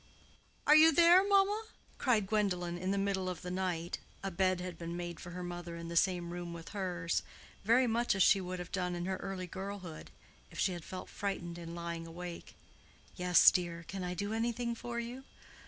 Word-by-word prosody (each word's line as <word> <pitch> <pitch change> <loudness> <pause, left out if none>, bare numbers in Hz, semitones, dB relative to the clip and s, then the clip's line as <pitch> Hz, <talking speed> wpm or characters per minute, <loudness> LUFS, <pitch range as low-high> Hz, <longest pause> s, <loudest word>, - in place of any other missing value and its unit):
"Are 300 - +7
you 320 +1 +8
there, 345 +4 +7
mamma?" 405 +2 +3 0.3
cried 225 -6 +3
Gwendolen, 190 -4 0
in 185 +2 -3
the 200 - +1
middle 195 -2 0
of 180 -3 -6
the 180 - -4
night 180 -2 -2 0.2
(a 195 - -2
bed 185 +1 +2
had 180 -1 -5
been 170 +1 -5
made 175 -1 -5
for 175 - -8
her 180 +1 -6
mother 175 -1 -6
in 170 0 -7
the 170 - -5
same 175 -1 +2
room 175 -1 -5
with 165 -1 -8
hers), 180 -4 -1 0.4
very 235 +5 +5
much 235 -1 +1
as 195 - +5
she 195 - +5
would 185 0 -4
have 180 -1 -7
done 180 -2 -1
in 175 0 -3
her 190 0 -1
early 185 -1 -5
girlhood, 190 -3 -7 0.4
if - - -12
she 190 - +2
had 175 -2 -7
felt 185 +1 -7
frightened 175 -4 -4
in 170 0 -7
lying 170 -1 -5
awake. 175 +1 -8 0.6
"Yes, 180 -1 +7
dear; 170 -2 -2
can 195 -1 -5
I 180 0 -3
do 200 +4 -2
anything 235 +1 -1
for 235 0 -5
you?" 240 +3 -6
185 Hz, 205 wpm, -33 LUFS, 175-205 Hz, 0.6 s, you